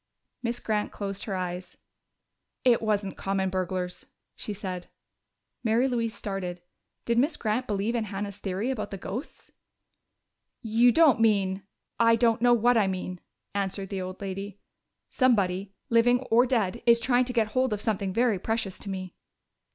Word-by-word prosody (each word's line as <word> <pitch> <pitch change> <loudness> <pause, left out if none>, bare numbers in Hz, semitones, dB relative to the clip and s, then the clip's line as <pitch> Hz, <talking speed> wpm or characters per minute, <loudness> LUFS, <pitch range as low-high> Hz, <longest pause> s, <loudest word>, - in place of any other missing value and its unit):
Miss 235 0 -2
Grant 210 -1 -1
closed 200 -1 -5
her 200 - -3
eyes. 180 0 -5 0.9
"It 245 -2 +5
wasn't 205 -3 -1
common 195 -1 -1
burglars," 185 -1 -3 0.3
she - - -5
said. 185 -3 -5 0.7
Mary 235 +3 +3
Louise 230 -3 -1
started. 185 -3 -4 0.5
Did 235 0 +2
Miss 295 +4 +1
Grant 225 +4 -1
believe 205 +2 -1
in 230 -2 0
Hannah's 200 0 -5
theory 200 +6 -2
about 215 -5 -3
the 195 - -6
ghosts? 210 - -7 1.1
"You 230 +2 +4
don't 295 -5 +5
mean 200 -3 +2 0.2
?" - - -54
"I 230 - +6
don't 230 -1 +2
know 245 0 +6
what 240 +1 +3
I 210 -3 +3
mean," 185 -1 -4 0.3
answered 195 -1 -2
the 195 -2 -3
old 185 0 -6
lady. 195 +1 -5 0.5
"Somebody 200 -6 +1
living 245 +2 +4
or 240 +3 +5
dead 235 -3 0
is 235 0 +7
trying 245 +1 +2
to 250 - -3
get 225 -3 +2
hold 255 +2 +1
of 210 - -1
something 200 -3 -1
very 230 -1 +2
precious 220 -2 -2
to 200 - -6
me." 185 -2 -5
210 Hz, 160 wpm, -27 LUFS, 190-235 Hz, 1.1 s, is